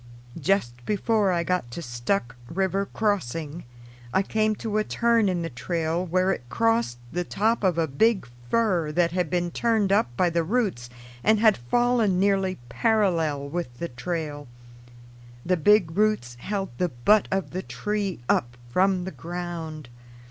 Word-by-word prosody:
Just 130 -8 0
before 210 - +1
I 170 -1 +1
got 180 -9 -1
to 120 - -6
Stuck 120 +1 -2
River 195 +2 0
crossing 165 - -2 0.5
I 190 - +2
came 215 +1 +1
to 215 0 -2
a - - +2
turn 230 -2 +2
in 175 -2 -1
the 165 - -3
trail 165 +6 -1
where 185 +2 +1
it - - -2
crossed 225 - +1
the 180 +1 -1
top 220 +5 0
of 180 -3 +2
a 165 - +2
big 190 - +2 0.2
fir 185 - +1
that 170 0 +2
had 180 -2 -1
been 175 0 0
turned 220 -3 +1
up 195 -11 +3
by 180 -2 +3
the 170 0 +1
roots 185 - -1 0.3
and 220 0 +4
had 220 -1 +5
fallen 220 - +1
nearly 195 -1 +2
parallel 165 - +1
with 145 -5 -4
the 170 - -4
trail. 145 +2 -4 1.0
The 185 - +3
big 175 -1 +4
roots 210 - +1
held 195 +6 -3
the 180 - +1
butt 175 - +3
of 195 -1 -1
the 185 - -3
tree 205 -5 -3
up 120 +1 +1
from 185 +4 +2
the 190 - -5
ground. 170 -4 -6
180 Hz, 160 wpm, -25 LUFS, 160-210 Hz, 1.0 s, had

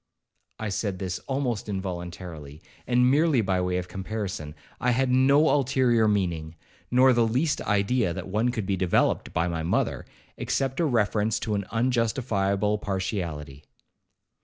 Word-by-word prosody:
I 110 - -4
said 100 0 -2
this 90 -1 -4
almost 130 -6 -2
involuntarily, 85 -5 -6 0.2
and 125 0 +4
merely 150 -1 +3
by 95 -3 0
way 90 0 0
of 90 0 -3
comparison. 95 -5 -5 0.2
I 125 - +1
had 125 +1 +2
no 140 +4 +5
ulterior 125 -5 +3
meaning, 85 -6 -1 0.3
nor 130 +1 +5
the 120 -1 +3
least 145 +7 0
idea 105 0 +1
that 85 - -5
one 110 +5 +1
could 115 -5 -3
be 100 0 0
developed 90 -1 +1
by 85 +2 0
my 85 -2 -2
mother, 80 - -1 0.3
except 135 -1 -1
a 170 - +3
reference 110 -4 +1
to 110 - -2
an 100 -1 -1
unjustifiable 110 -4 0
partiality. 85 -8 -4
105 Hz, 145 wpm, -26 LUFS, 90-125 Hz, 0.3 s, no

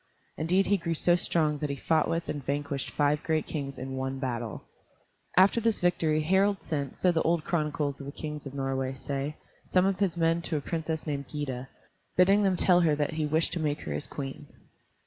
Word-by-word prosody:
Indeed 180 +5 +2
he 200 - +3
grew 165 -2 -2
so 175 +2 +4
strong 155 -4 +1
that 150 - -2
he 140 - -1
fought 160 +2 +1
with 165 0 -1
and 145 - -4
vanquished 140 0 -2
five 150 0 +1
great 160 -2 0
kings 140 -3 -4
in 130 +1 -5
one 130 0 -2
battle. 120 -5 -3 0.7
After 195 +5 +6
this 225 -1 +1
victory, 160 -3 +2
Harald 190 +2 +2
sent, 140 -4 -3
so 180 - +4
the 165 -2 +1
old 165 -1 +1
chronicles 150 -4 -1
of 140 - -7
the - - -4
kings 150 -1 -6
of 140 - -9
Norway 135 -1 -1
say, 140 +2 -3 0.3
some 185 0 +3
of 195 -1 +1
his 185 -4 +1
men 165 0 +2
to 165 -2 -2
a - - 0
princess 160 0 -3
named 140 -3 -3
Gyda, 135 -4 -4 0.5
bidding 195 +3 +6
them 190 -3 +2
tell 180 0 +5
her 160 -4 +3
that 150 +2 -1
he 155 -1 -1
wished 160 +2 +1
to 175 - -1
make 150 -1 -1
her - - -4
his - - -3
queen. 140 +1 -6
155 Hz, 210 wpm, -29 LUFS, 140-170 Hz, 0.7 s, After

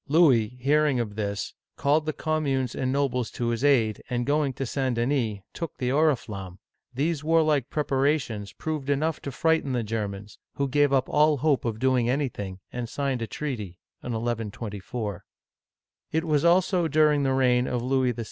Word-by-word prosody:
Louis, 130 -7 +4
hearing 145 0 +2
of 110 -3 -2
this, 100 -2 -3 0.2
called 150 +2 +2
the - - +2
com 155 0 -1
munes 130 -3 0
and 130 -1 -1
nobles 130 -4 0
to 120 -1 -1
his 115 +2 -2
aid, 115 -7 +3
and 120 -1 -1
going 145 0 +1
to 135 +1 -4
St. 130 0 -1
Denis, 115 -4 0
took 165 -3 -6
the 125 - -1
oriflamme. 115 - 0 0.3
These 145 +4 -1
warlike 155 -4 +2
preparations 135 -7 0
proved 155 -3 -4
enough 150 +2 0
to 140 - -5
frighten 160 -1 +1
the 120 -2 0
Germans, 105 -2 -5 0.2
who 140 - 0
gave 145 +1 +3
up 135 -1 +2
all 150 0 +3
hope 140 -1 +1
of 115 -2 -1
doing 125 -1 +2
anything, 115 -9 -2
and 120 -2 -4
signed 135 -3 -2
a 115 - -2
treaty 110 - -5
( - - -58
1 125 - -5
1 115 -1 -2
24). 105 -1 -5 0.9
It 160 +1 0
was 150 -3 +1
also 175 0 +3
during 150 -1 +3
the 135 -1 +1
reign 125 -1 +3
of 120 -1 -2
Louis 130 -1 +1
VI. 120 - -10
130 Hz, 180 wpm, -26 LUFS, 115-150 Hz, 0.9 s, Louis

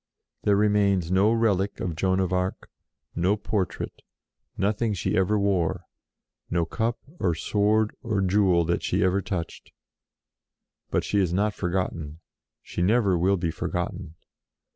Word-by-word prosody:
There 105 - +3
remains 100 -4 +2
no 100 +4 +4
relic 105 -4 +1
of 85 -3 -3
Joan 95 +3 +1
of 95 -1 0
Arc; 90 +1 -2 0.4
no 95 +5 +2
portrait, 100 -2 -3 0.6
nothing 105 +2 0
she 85 - -1
ever 95 +3 +2
wore, 95 -5 0 0.7
no 85 -1 +1
cup 115 +7 -1 0.2
or 85 -3 +1
sword 105 +5 +1
or 110 -3 -1
jewel 95 -3 +3
that 85 +1 0
she 95 +3 0
ever 95 +1 +2
touched. 90 -4 -5 1.2
But - - 0
she 105 - 0
is 90 -4 +1
not 105 +3 +1
forgotten; 85 -5 -3 0.4
she - - -5
never 100 0 +3
will 95 +3 +2
be 85 -2 -1
forgotten. 85 -2 -4
95 Hz, 140 wpm, -26 LUFS, 90-105 Hz, 1.2 s, no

